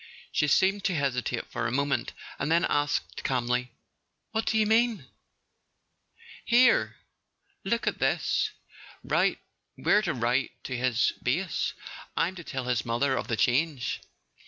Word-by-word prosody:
She 150 - +2
seemed 190 +7 +3
to 185 - +1
hesitate 125 -4 -1
for 115 - -1
a - - -2
moment, 140 +2 0 0.3
and 145 +3 -1
then 170 +2 +4
asked 145 0 -1
calmly: 125 -1 0 0.3
" - - -52
What 220 0 -1
do 220 - +2
you 215 - +4
mean? 225 +1 +2 0.7
" - - -49 0.7
"Here—look 255 +4 0
at - - -1
this. - - +1 0.5
We're 210 - 0
to - - 0
write 120 +3 0
to 130 - -4
his 125 -2 +1
base. - - -1 0.4
I'm 180 - +1
to 175 -2 -9
tell 135 -4 -4
his 125 -3 0
mother 130 +3 +1
of - - -3
the 115 -4 -1
change." 130 +3 +1
140 Hz, 140 wpm, -28 LUFS, 125-195 Hz, 0.7 s, then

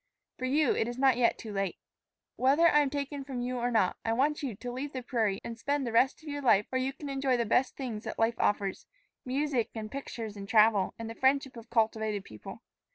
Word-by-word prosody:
For 255 - -2
you, 285 +1 +3
it 225 - 0
is 240 0 -5
not 265 -1 +4
yet 240 -1 +2
too 215 -2 -8
late. 195 -2 -2 0.6
"Whether 280 +6 +4
I 295 - +5
am 290 -2 +2
taken 285 0 -4
from 265 -2 -5
you 250 +1 -2
or 240 +1 0
not, 220 -6 +2
I 225 - 0
want 295 +6 +1
you 260 -7 -3
to 245 +5 -6
leave 275 +4 -5
the 255 -1 -4
prairie 220 -6 0
and 230 -1 -7
spend 280 +2 -1
the 235 - -2
rest 260 +6 +2
of - - -13
your 285 0 -4
life 215 -6 +4
where 260 0 0
you 265 +1 -1
can 290 +2 -9
enjoy 270 -2 +1
the 235 - 0
best 250 +4 +2
things 235 -6 -5
that - - -5
life 225 +1 +1
offers 200 -2 0 0.4
music 265 -2 0
and 215 -1 -5
pictures 230 -6 -6
and 200 -1 -8
travel, 215 -3 +4
and 230 - -6
the 225 - -5
friendship 265 +1 +1
of 230 0 -11
cultivated 220 -3 0
people. 105 -1 -10
245 Hz, 235 wpm, -30 LUFS, 220-275 Hz, 0.6 s, I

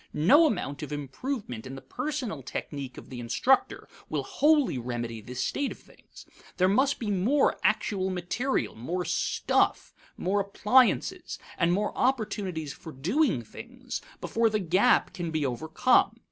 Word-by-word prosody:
No 285 - +6
amount 145 - -3
of 150 - -6
improvement 145 - -5
in 135 - -7
the 135 - -9
personal 250 - -4
technique 135 0 -6
of - - -11
the 125 - -6
instructor 125 - +1 0.2
will - - -1
wholly 300 - +2
remedy 120 -2 -4
this 125 +4 -4
state 285 -1 -1
of - - -8
things. - - -17 0.3
There 185 - +4
must 265 +9 +2
be 215 -3 -3
more 225 +10 +2
actual 190 -2 +1
material, 185 +9 -1
more 175 +11 -3
stuff, 175 - 0 0.2
more 200 +3 0
appliances, 210 +5 +2 0.2
and 170 0 +2
more 205 +4 0
opportunities 205 - -1
for 160 - -10
doing 170 - +1
things, 245 - -8 0.2
before 230 0 +1
the 215 - 0
gap 190 +5 +3
can 175 -3 -4
be 155 -2 -1
overcome. 160 - +2
185 Hz, 145 wpm, -28 LUFS, -, 0.3 s, No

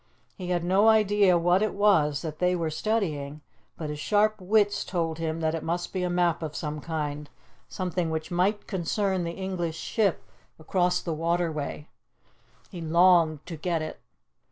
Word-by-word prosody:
He 180 - -7
had 175 -1 0
no 190 +5 +3
idea 205 -4 +4
what 175 +3 +3
it 215 - 0
was 160 -9 +3
that 155 -2 -6
they 180 0 +2
were 165 -2 -2
studying, 155 -6 -2 0.4
but 155 -2 -4
his 150 - -6
sharp 210 +7 +2
wits 205 +2 +2
told 165 -3 -2
him 165 0 -2
that 160 0 0
it 165 - -3
must 175 +2 -3
be 185 - -1
a 180 - 0
map 175 -2 +1
of 155 -2 -5
some 150 -1 -4
kind, 150 -2 -4 0.4
something 180 -2 -2
which 160 +2 -4
might 190 +4 +1
concern 190 0 -1
the 170 - -3
English 175 -3 -3
ship 205 -1 0 0.3
across 180 +2 0
the 170 - -2
waterway. 160 -2 -2 0.8
He 180 -4 -7
longed 165 -2 +4
to 170 - -6
get 165 0 -2
it. 155 - -7
175 Hz, 170 wpm, -27 LUFS, 160-190 Hz, 0.8 s, idea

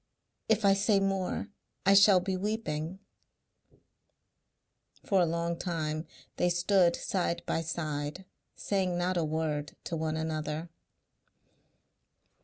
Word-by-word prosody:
If 220 -1 +3
I 195 - +7
say 200 +1 +3
more 195 +1 -1 0.4
I 195 - +6
shall 200 -1 +7
be 190 +1 -2
weeping." 185 -5 -3 2.1
For 195 -2 +3
a 175 - +3
long 170 +1 -2
time 155 -3 -2 0.3
they 180 - +2
stood 175 0 +3
side 175 -2 -1
by 165 - 0
side 155 +1 -4 0.3
saying 185 -3 -1
not 180 +1 0
a 170 - +1
word 150 -2 -2
to 170 - -4
one 160 -1 -1
another. 155 +1 -3
175 Hz, 115 wpm, -30 LUFS, 160-195 Hz, 2.1 s, I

